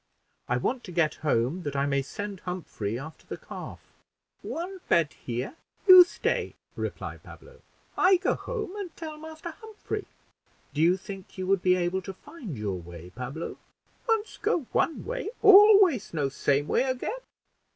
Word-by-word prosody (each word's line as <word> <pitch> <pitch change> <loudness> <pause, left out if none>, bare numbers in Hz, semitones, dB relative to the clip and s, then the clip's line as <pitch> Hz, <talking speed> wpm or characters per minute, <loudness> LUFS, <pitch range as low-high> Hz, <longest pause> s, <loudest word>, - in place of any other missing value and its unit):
I 125 - +1
want 245 - -1
to 180 - -8
get 165 -3 +2
home, 145 +3 +1
that 145 -4 -4
I 140 0 +1
may 140 -1 +1
send 200 +7 -6
Humphrey 160 - -4
after 155 +5 -10
the - - -5
calf." - - -9 0.6
"One 370 +3 -5
bed 165 -3 +3
here; 125 - -5 0.3
you 370 -1 +12
stay," - - -2 0.2
replied - - -5
Pablo. 485 0 -14 0.3
"I 375 0 +5
go 370 - +1
home, 425 -6 -5
and 385 -5 -7
tell 315 -2 -6
Master 315 +2 -8
Humphrey." 435 -1 -6 0.7
"Do 150 - -1
you 175 +3 +5
think 195 -1 -10
you 185 - -3
would 195 -1 +2
be 180 0 +4
able 180 +1 0
to 195 +1 -7
find 255 - -9
your 100 -4 -3
way, 85 +1 -11
Pablo?" 130 - -6 0.5
"Once 445 -1 0
go 320 - +1
one 325 - 0
way, - - -3
always 395 - +7
know 145 -3 +1
same 140 +1 +1
way - - +2
again." 260 - -2
190 Hz, 160 wpm, -27 LUFS, -, 0.7 s, you